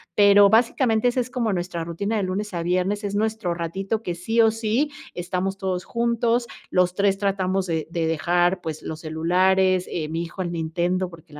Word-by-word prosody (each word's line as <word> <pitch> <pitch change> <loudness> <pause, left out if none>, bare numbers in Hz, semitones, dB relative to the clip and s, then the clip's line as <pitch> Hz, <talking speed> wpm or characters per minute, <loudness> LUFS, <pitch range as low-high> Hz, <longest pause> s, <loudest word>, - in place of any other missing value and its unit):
Pero 200 -1 +7
básicamente, 230 0 +3
esa 245 - -1
es 245 0 -2
como 245 -4 -1
nuestra 175 -2 -3
rutina 185 +7 -3
de 210 - 0
lunes 195 +2 -3
a 170 -1 -2
viernes, 185 +4 0
es 200 -1 -3
nuestro 215 -4 -1
ratito 195 +6 -3
que 175 - -3
sí 225 +7 -1
o 225 -1 +6
sí 225 +6 0 0.3
estamos 185 +2 -2
todos 185 -2 -2
juntos, 235 0 0 0.2
los 180 0 +2
3 200 0 +2
tratamos 195 -1 0
de 160 -2 -2
de 165 -1 -1
dejar, 175 +3 +1
pues, 155 -1 -6
los 155 0 -6
celulares, 185 +3 +2
eh, 155 -3 -2
mi 165 +2 -3
hijo 170 +3 -6
el 175 -1 -3
Nintendo, 175 +3 -1
porque 165 -2 -15
185 Hz, 190 wpm, -23 LUFS, 175-215 Hz, 0.3 s, Pero